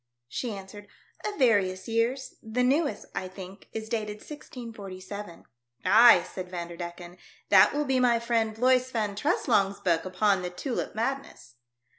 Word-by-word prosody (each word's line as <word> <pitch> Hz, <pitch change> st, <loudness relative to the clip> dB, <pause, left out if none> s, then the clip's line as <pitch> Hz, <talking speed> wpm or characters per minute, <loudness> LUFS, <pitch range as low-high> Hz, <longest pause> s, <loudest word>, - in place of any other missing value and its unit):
She 235 Hz, -, -4 dB
answered, 200 Hz, +1 st, -10 dB, 0.4 s
"Of 415 Hz, -1 st, -3 dB
various 195 Hz, -7 st, +2 dB
years; 235 Hz, +4 st, 0 dB
the 225 Hz, +3 st, -1 dB
newest, 285 Hz, +4 st, +1 dB
I 185 Hz, -, -3 dB
think, 190 Hz, +1 st, -11 dB
is 220 Hz, 0 st, -5 dB
dated 215 Hz, -2 st, -2 dB
1647." 210 Hz, -, -9 dB, 0.4 s
"Ay," 225 Hz, -6 st, +8 dB
said 185 Hz, 0 st, -7 dB
Vanderdecken, 175 Hz, 0 st, -7 dB, 0.3 s
"that -, -, +7 dB
will 295 Hz, +1 st, -1 dB
be 265 Hz, -2 st, +2 dB
my 245 Hz, -2 st, +4 dB
friend 230 Hz, -2 st, 0 dB
Bloys 255 Hz, +2 st, +3 dB
Van 215 Hz, -5 st, -2 dB
Treslong's 200 Hz, -1 st, +1 dB
book 165 Hz, -3 st, +1 dB
upon 190 Hz, +1 st, +1 dB
the 180 Hz, -, -3 dB
tulip 235 Hz, +8 st, -4 dB
madness." 235 Hz, -, -4 dB
215 Hz, 140 wpm, -28 LUFS, 185-245 Hz, 0.4 s, Ay